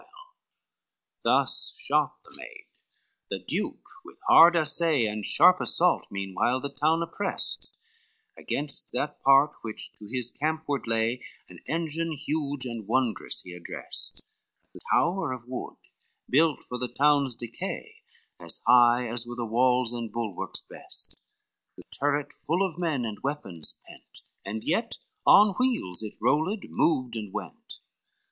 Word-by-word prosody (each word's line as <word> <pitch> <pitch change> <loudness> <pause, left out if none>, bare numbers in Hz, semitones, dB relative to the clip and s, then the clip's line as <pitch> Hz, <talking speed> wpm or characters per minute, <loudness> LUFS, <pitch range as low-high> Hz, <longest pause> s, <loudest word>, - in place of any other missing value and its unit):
XLVI - - -24 1.2
Thus - - +2
shot 480 - +1
the - - -17
maid: 455 -2 -11 0.6
the - - -2
duke - - -3 0.2
with 390 - -14
hard 170 +2 +8
assay 155 -4 +2
And 105 0 -3
sharp 180 - +5
assault, 180 +1 +3
meanwhile 100 +6 -1
the 140 +1 -6
town 160 +3 +2
oppressed, 190 +4 -1 0.7
Against 145 -1 -3
that 140 +4 -3
part 135 +2 +6
which 110 -2 -3
to 105 - -11
his 125 +1 -2
campward 155 -3 -2
lay 115 +2 0 0.3
An - - -13
engine 165 0 -1
huge 145 -2 -2
and 115 -4 -6
wondrous 125 -1 -1
he 90 - -10
addressed, 90 -1 0 0.5
A - - -10
tower 175 -5 +2
of 120 -2 -9
wood 125 0 -6 0.5
built 155 +2 +3
for 125 - -7
the 125 - -2
town's 140 -1 +3
decay 115 0 -6 0.4
As - - -4
high 120 0 +5
as 120 +1 -4
were 120 - -6
the 120 -1 -3
walls 125 +1 +2
and 115 -2 -5
bulwarks 110 -5 -4
best, - - -5 0.6
A - - -11
turret 145 0 -1
full 175 +5 -1
of 175 -2 -11
men 155 -8 -1
and 110 -2 -5
weapons 115 - -2
pent, - - -10 0.2
And 110 +3 -5
yet - - -1 0.3
on 205 -1 +7
wheels 240 - 0
it 110 -1 -7
rolled, 155 - +1
moved, 130 -7 +1
and 105 -3 -5
went. - - -7
130 Hz, 140 wpm, -27 LUFS, 115-160 Hz, 1.2 s, hard